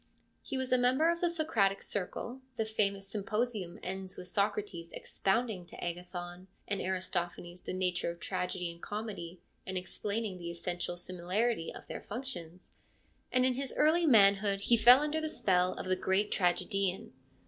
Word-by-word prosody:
He 265 - -4
was 260 -1 -2
a 255 - +5
member 260 +7 +4
of 340 - -3
the 350 - +3
Socratic 230 - +1
Circle 235 +6 -3 0.2
(the 220 - +1
famous 200 -2 0
Symposium 210 -2 -2
ends 190 0 -4
with 180 - -6
Socrates 200 -4 -1
expounding 210 -1 0
to - - -8
Agathon 175 +1 -5 0.2
and 200 -2 -1
Aristophanes 180 -1 -3
the - - -5
nature 180 -2 0
of 170 0 -6
tragedy 180 0 -2
and 170 0 -14
comedy, 205 -5 -5 0.2
and 190 0 -3
explaining 200 +2 -3
the 170 -1 -5
essential 175 +1 -3
similarity 180 +3 -1
of - - -10
their - - -6
functions), 185 -8 -6 0.6
and 255 0 +3
in 260 - +3
his 270 +1 -2
early 325 +3 +4
manhood 200 -4 +5
he 235 - +4
fell 245 +4 +8
under 300 +1 0
the 315 - -1
spell 180 -8 +2
of - - -5
the 185 0 +2
great 190 +3 +1
tragedian. 190 0 +1
195 Hz, 160 wpm, -32 LUFS, 180-235 Hz, 0.6 s, fell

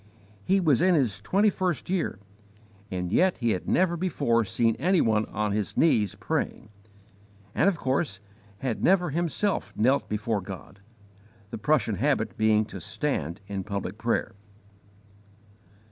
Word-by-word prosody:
He 195 - +3
was 155 -6 +3
in 180 0 +4
his 115 - 0
twenty 200 - +2
first 180 -5 -2
year, 180 - -1 0.7
and 90 -1 -3
yet 185 - +3
he 120 -2 +1
had 90 - -3
never 180 -1 +2
before 145 -10 +1
seen 115 +3 +1
any 180 +5 +2
one 110 -4 +2
on 105 -1 -2
his 105 -1 -2
knees 105 -11 +3
praying, 120 -1 -3 0.8
and 200 - +3
of 185 - -2
course 130 - -1 0.4
had 130 -4 -2
never 180 -3 +3
himself 175 +5 -1
knelt 130 +6 +2
before 105 0 -1
God, 95 +1 -9 0.7
the - - -5
Prussian 115 -5 +1
habit 130 -1 0
being 110 0 +3
to 95 - -9
stand 105 - -3
in 100 -1 -4
public 100 +2 -5
prayer. 115 +1 -1
115 Hz, 145 wpm, -27 LUFS, 105-170 Hz, 0.8 s, in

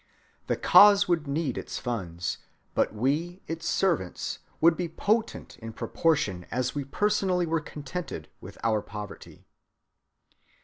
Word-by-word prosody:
The - - +1
cause 200 -1 +7
would 170 -4 +1
need 140 -2 -1
its - - -6
funds, 90 -8 -3 0.3
but - - +2
we 150 - -1
its 165 0 -5
servants 165 - 0 0.2
would 165 +1 +5
be 175 -1 -3
potent 215 +7 -1
in 115 0 -7
proportion 105 - 0
as 125 0 -1
we 145 - -2
personally 190 +3 +1
were 165 -1 0
contented 150 +3 -6
with - - -11
our 110 -2 +2
poverty. 105 0 -9
155 Hz, 130 wpm, -27 LUFS, 115-175 Hz, 0.3 s, cause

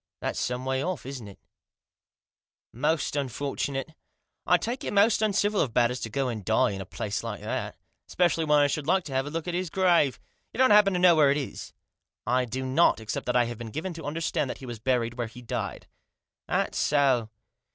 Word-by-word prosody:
" - - -66
That's - - -2
some 125 +1 -2
way 130 0 0
off, 180 -6 -3
isn't 130 -5 -7
it? 100 - -12 1.4
Most 150 +5 0
unfortunate. 140 +2 -3 0.5
I - - +6
take 245 +3 -4
it - - -3
most 205 +2 +4
uncivil 210 -1 +2
of 120 -6 -2
Batters 125 +1 +2
to 115 - -5
go 135 +4 -1
and 115 -4 -4
die 110 0 +2
in 95 -1 -5
a 95 - -8
place 105 -1 -4
like - - -5
that. - - -4 0.3
Epecially 175 -2 +2
when 150 0 +5
I 145 - +5
should 145 0 -2
like 190 +1 +3
to 140 - -8
have 135 +2 0
a - - -3
look 165 +2 -4
at 175 - -2
his 180 0 -2
grave. 170 - +2 0.3
You - - -9
don't 260 -2 +5
happen 205 -2 +6
to 180 - 0
know 175 -1 +6
where 150 -3 +5
it 140 - +2
is." 140 - -6 0.3
" - - -62
I 125 - 0
do 130 +2 -4
not, 130 +3 +3
except 110 -1 -5
that 125 - 0
I 120 -1 +4
have 120 -1 -6
been 115 -1 -6
given 160 - -4
to 160 -3 -9
under 160 +3 -3
stand 145 -3 -1
that - - -5
he 135 - -10
was 120 -3 -7
buried 120 0 -1
where 120 - -1
he 125 +2 -12
died." 115 - -4 0.3
" - - -65
That - - 0
so 135 -6 +2
140 Hz, 230 wpm, -27 LUFS, 120-170 Hz, 1.4 s, I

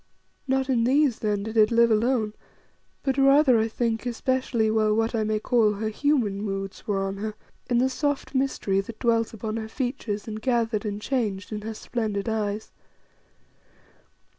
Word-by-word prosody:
Not 265 0 +1
in 245 -4 +2
these 270 0 +3
then 210 -2 -1
did 220 +1 -6
it 215 -1 +5
live 235 0 +4
alone, 220 -1 +1 0.7
but 270 0 0
rather, 275 -2 +5
I 220 - +2
think, 230 +1 -2
especially 245 -2 0
while 215 -1 +2
what 225 +1 +1
I 225 -2 +1
may 215 0 0
call 220 -2 +3
her 215 +2 -2
human 220 -5 0
moods 195 -2 -5
were 195 -2 0
on 195 0 -3
her, 215 +1 -4 0.3
in 240 - +2
the 250 +2 +4
soft 285 +2 -2
mystery 260 -7 0
that 220 +3 -10
dwelt 230 -1 +1
upon 220 0 -4
her 220 -1 -5
features 240 -5 -3
and 215 0 -5
gathered 235 -3 0
and 205 -1 -3
changed 210 -5 -2
in 210 -1 -4
her 220 +1 -5
splendid 215 -3 -3
eyes. 215 -1 -2
225 Hz, 170 wpm, -25 LUFS, 210-250 Hz, 0.7 s, it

